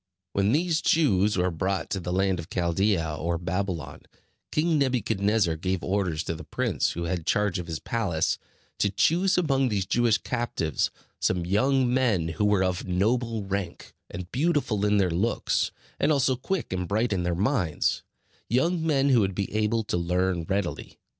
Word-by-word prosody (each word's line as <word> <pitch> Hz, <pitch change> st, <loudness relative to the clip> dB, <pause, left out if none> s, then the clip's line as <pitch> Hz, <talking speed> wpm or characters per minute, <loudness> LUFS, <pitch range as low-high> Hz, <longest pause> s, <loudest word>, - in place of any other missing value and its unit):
When 100 Hz, +1 st, +2 dB
these 165 Hz, +3 st, +1 dB
Jews 105 Hz, -, +3 dB
were 90 Hz, 0 st, +1 dB
brought 95 Hz, +4 st, -2 dB
to 95 Hz, -, -1 dB
the 90 Hz, 0 st, -4 dB
land 95 Hz, 0 st, +1 dB
of 85 Hz, +2 st, -7 dB
Chaldea 85 Hz, -2 st, 0 dB
or 85 Hz, +1 st, -1 dB
Babylon, 90 Hz, 0 st, -3 dB, 0.5 s
King 155 Hz, 0 st, +2 dB
Nebuchadnezzar 110 Hz, -, +1 dB
gave 95 Hz, +2 st, -2 dB
orders 90 Hz, -5 st, -1 dB
to -, -, -3 dB
the 80 Hz, -1 st, -8 dB
prince, -, -, -1 dB
who 85 Hz, -, -4 dB
had 85 Hz, -1 st, -3 dB
charge 105 Hz, -3 st, +1 dB
of 85 Hz, -, -6 dB
his 80 Hz, -2 st, -3 dB
palace, 90 Hz, -6 st, -1 dB, 0.4 s
to 100 Hz, -, +2 dB
choose 175 Hz, -, +2 dB
among 135 Hz, -7 st, +2 dB
these 100 Hz, -4 st, -1 dB
Jewish 115 Hz, +2 st, +2 dB
captives 120 Hz, -, -1 dB, 0.3 s
some 90 Hz, -2 st, 0 dB
young 125 Hz, +6 st, +2 dB
men 110 Hz, -11 st, +2 dB
who 85 Hz, +6 st, -1 dB
were 105 Hz, -2 st, +3 dB
of 90 Hz, 0 st, -2 dB
noble 110 Hz, +4 st, 0 dB
rank, 95 Hz, -3 st, -4 dB, 0.2 s
and 90 Hz, 0 st, -7 dB
beautiful 135 Hz, -8 st, +1 dB
in 105 Hz, 0 st, +3 dB
their 95 Hz, -3 st, +2 dB
looks, 100 Hz, +8 st, 0 dB, 0.3 s
and 145 Hz, -, +3 dB
also 135 Hz, -3 st, +2 dB
quick 145 Hz, -, -3 dB
and 90 Hz, -1 st, -2 dB
bright 110 Hz, +3 st, +1 dB
in 95 Hz, -, 0 dB
their 90 Hz, -1 st, -1 dB
minds; 95 Hz, -, 0 dB, 0.5 s
young 160 Hz, +8 st, +1 dB
men 140 Hz, -3 st, +2 dB
who 130 Hz, -3 st, +5 dB
would 95 Hz, -3 st, 0 dB
be 100 Hz, +1 st, -3 dB
able 110 Hz, +1 st, +1 dB
to 105 Hz, -, -2 dB
learn 90 Hz, 0 st, 0 dB
readily. 95 Hz, 0 st, -3 dB
100 Hz, 175 wpm, -26 LUFS, 90-125 Hz, 0.5 s, who